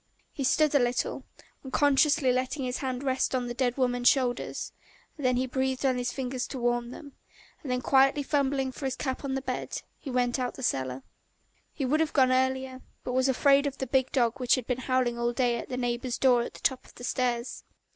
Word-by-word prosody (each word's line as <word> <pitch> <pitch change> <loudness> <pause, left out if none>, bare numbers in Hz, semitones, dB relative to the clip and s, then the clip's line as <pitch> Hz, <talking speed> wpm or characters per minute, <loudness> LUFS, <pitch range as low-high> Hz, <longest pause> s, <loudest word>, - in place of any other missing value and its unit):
He 275 - -4
stood 300 +3 +3
a 285 - +5
little, 245 0 -1 0.4
unconsciously 285 +1 +3
letting 255 +2 -1
his 250 0 -3
hands 260 -1 -3
rest 265 -1 0
on 250 -1 -1
the 240 - -4
dead 245 0 0
woman's 245 -1 +3
shoulders, 250 -3 -1 0.4
then 255 -4 +1
he 255 - +1
breathed 260 +1 -1
on 255 -2 +2
his 245 0 -1
fingers 255 -1 -3
to 270 - -6
warm 240 -1 0
them, 285 +3 -10 0.5
and 270 - -5
then 250 0 0
quietly 275 +2 +4
fumbling 275 -2 0
for 270 - -7
his 265 - -1
cap 260 -1 -3
on 270 -1 -2
the 270 - -3
bed, 255 -2 -4 0.2
he 280 - -8
went 245 0 0
out 250 -1 -2
of - - -16
the 265 - -8
cellar. 130 - -1 0.7
He 275 - -3
would 295 +5 +2
have 320 -1 0
gone 260 -3 +4
earlier, 260 0 0 0.2
but 250 - -4
was 260 +1 +2
afraid 280 +2 +4
of 275 - -5
the 265 - -3
big 260 0 +1
dog 240 0 +1
which 245 -1 +3
had 255 -3 -4
been 250 0 -2
howling 255 -2 0
all 240 0 0
day 240 -1 +1
at - - -8
the 250 - -3
neighbour's 245 0 -2
door 250 -3 +4
at - - -6
the - - -12
top 260 -2 0
of - - -19
the 245 - -11
stairs. 245 -1 -2
255 Hz, 225 wpm, -28 LUFS, 245-270 Hz, 0.7 s, a